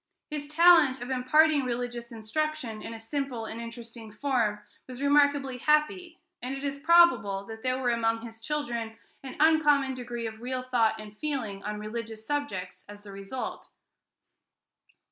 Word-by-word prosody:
His 295 -1 -4
talent 310 -4 +6
of 245 +2 -6
imparting 290 +3 +4
religious 240 -1 -4
instruction 230 0 -3
in - - -7
a - - -6
simple 245 0 -4
and 225 +1 -6
interesting 230 -1 -9
form 220 -3 0 0.3
was 255 -1 -9
remarkably 285 -2 +3
happy, 315 +5 +1 0.2
and 255 +2 -4
it 270 - -7
is 280 0 -3
probable 310 -12 +4
that 220 +1 -9
there 255 +1 -1
was 245 -2 +1
among 225 -1 0
his 225 -1 -10
children 235 -5 -3 0.2
an 265 +1 -8
uncommon 295 -3 +4
degree 240 -2 -5
of 220 0 -6
real 255 +1 -3
thought 230 -3 +1
and 210 -1 -10
feeling 240 -10 -3
on 210 0 -4
religious 220 +1 -6
subjects 255 -11 -3
as 205 0 -11
the 205 - -10
result. 195 +6 -6
250 Hz, 155 wpm, -28 LUFS, 225-285 Hz, 0.3 s, talent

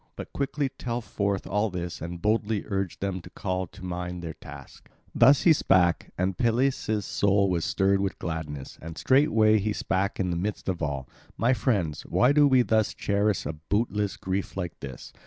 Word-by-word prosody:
But - - -8
quickly 140 0 -1
tell 120 -1 -2
forth 100 -3 -2
all 105 +4 0
this 85 -4 -5
and 85 +1 -5
boldly 105 0 +1
urge 95 -3 -3
them 95 -2 -2
to - - -12
call 95 0 -3
to 95 +2 -12
mind 90 0 -4
their 80 -1 -5
task." - - -13 0.2
Thus 140 +1 +6
he 165 - +7
spake; 90 - +2
and 95 +1 0
Peleus' 115 -3 +1
soul 100 -1 +2
was 85 -2 0
stirred 95 0 +2
with 100 -1 -2
gladness, 75 -5 -5
and 80 +1 -8
straightway 110 -6 +4
he 105 +1 -1
spake 95 0 -1
in 90 -2 0
the - - -1
midst 100 +4 -3
of 90 -3 -2
all: 70 -4 -2 0.3
"My 120 +3 +3
friends, 95 - 0
why 125 - +3
do 145 0 +5
we 130 -2 +5
thus 110 -2 +1
cherish 100 0 0
a 75 - -3
bootless 105 +5 -1
grief 95 +1 -3
like 90 -4 -4
this? 65 -2 -9
100 Hz, 185 wpm, -27 LUFS, 90-110 Hz, 0.3 s, he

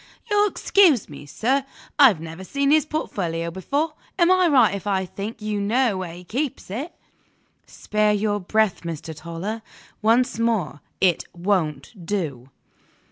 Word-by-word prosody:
"You'll 415 0 +4
excuse 350 - +3
me, 145 0 -10
sir? 260 - 0 0.4
I've 250 - +7
never 165 +3 -8
seen 280 +7 0
his 310 0 +4
portfolio 170 - -3
before. 285 - -2 0.2
Am 345 -1 +4
I 370 -1 +5
right 255 -9 +5
if 200 +1 -5
I 190 -2 +1
think 210 +4 -7
you 210 -1 -2
know 230 +2 +2
where 180 -3 -5
he 180 - -11
keeps 255 - -4
it?" 275 - -5 0.7
"Spare 210 0 0
your 205 0 0
breath, 215 +1 +1
Mr. 165 -1 -6
Toller. 170 +8 -5 0.4
Once 230 +1 +2
more, 210 -11 0 0.2
it 180 -3 +2
won't 175 - -2
do!" 155 -10 -3
205 Hz, 145 wpm, -23 LUFS, 175-260 Hz, 0.7 s, I've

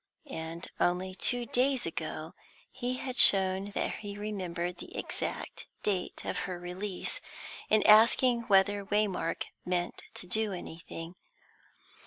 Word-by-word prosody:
And, 160 +2 -5
only 180 +1 +1
two 245 +5 0
days 255 +2 +2
ago, - - -5 0.4
he 250 0 -3
had 255 -1 -4
shown 190 0 +7
that - - -1
he 205 -1 -7
remembered 180 -4 -4
the - - -10
exact - - -4 0.2
date 195 -4 -2
of - - -2
her 180 -1 -4
release, 180 +2 -2 0.5
in 215 0 +4
asking 235 +2 +6
whether 200 0 +4
Waymark 205 -1 0 0.2
meant 180 -1 -2
to - - -4
do 210 +3 0
anything. 165 -1 -8
195 Hz, 125 wpm, -30 LUFS, 180-215 Hz, 0.5 s, shown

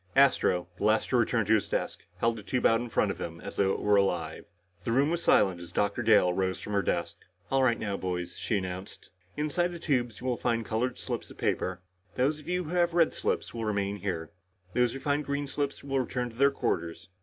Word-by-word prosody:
Astro, 130 -10 +4
the - - -4
last 110 +1 +3
to 125 - +3
return 115 -2 +2
to 110 - +3
his 105 -5 +2
desk, - - -3
held 115 +4 +1
the 110 - -7
tube 120 +5 -1
out 115 +1 +5
in 120 - -5
front 105 -2 +2
of - - -7
him 85 0 -5
as - - -7
if 100 - +4
it 95 - 0
were 105 -1 +3
alive. 85 -5 0 0.4
The 115 - -1
room 140 +6 +3
was 170 0 -1
silent 95 - +3
as 85 0 -10
Dr. 100 +5 0
Dale 105 -6 +5
rose 95 -1 -1
from 105 - -6
her 100 - +3
desk. - - -2 0.3
"All 135 0 +3
right 120 -3 +3
now, 100 -2 -2
boys," 90 -1 -3
she 110 - -1
announced. 95 0 -6 0.3
"Inside 155 +4 +1
the 175 - -6
tubes 125 -9 -1
you - - -9
will 125 -2 0
find 115 -2 0
colored 115 +4 -1
slips - - -4
of - - -13
paper. 90 -1 -1 0.3
Those 140 +4 +1
of 150 - -10
you 180 0 0
who 155 - -7
have 175 -1 +2
red 165 -2 +4
slips - - -2
will 115 -1 -4
remain 100 -1 -1
here. 90 -5 -4 0.4
Those 125 -1 +2
who 135 - -5
find 145 +2 0
green 140 +1 -2
slips 140 0 -3
will 135 -1 0
return 125 -1 -2
to - - -17
their 140 +3 +5
quarters. 85 -9 -3
115 Hz, 235 wpm, -29 LUFS, 95-135 Hz, 0.4 s, out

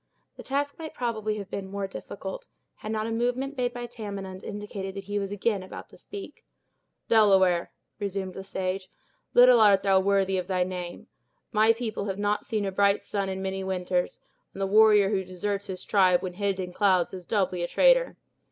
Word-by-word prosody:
The - - -9
task 285 +2 -2
might 315 -1 -7
probably 215 -3 -2
have 200 -2 -7
been 195 -1 -5
more 200 0 -3
difficult, - - -7 0.3
had 215 - -6
not 215 0 -1
a 225 - -3
movement 245 +4 -1
made 250 -2 0
by 240 0 -6
Tamenund 200 -5 -7
indicated 200 -2 -6
that 195 - -5
he 205 +1 -2
was 195 -1 -4
again 205 0 0
about 185 - -9
to - - -16
speak. 405 -1 -10 0.6
"Delaware!" 190 -6 +4 0.3
resumed 195 -2 -3
the 190 - -7
sage, 190 0 -3 0.5
"little 245 -1 +8
art 200 -2 +6
thou 195 -1 +4
worthy 195 -1 +2
of 180 - -5
thy 185 -1 +1
name. 180 -1 -6 0.5
My 220 0 +5
people 225 -3 -3
have 195 -2 -3
not 205 0 0
seen 215 -2 -1
a 195 - -2
bright 200 +1 +2
sun 200 -2 -2
in 190 0 -4
many 190 0 -3
winters; 180 -1 -1 0.3
and 195 - -7
the - - +2
warrior 210 0 +5
who 195 -2 0
deserts 195 +2 -3
his 185 -1 -6
tribe 185 -3 +4
when 185 -1 -4
hid 195 0 -1
in 180 -1 -4
clouds 190 -4 +2
is 180 -2 -8
doubly 185 -4 0
a 175 - -1
traitor. - - +4
200 Hz, 195 wpm, -27 LUFS, 190-220 Hz, 0.6 s, little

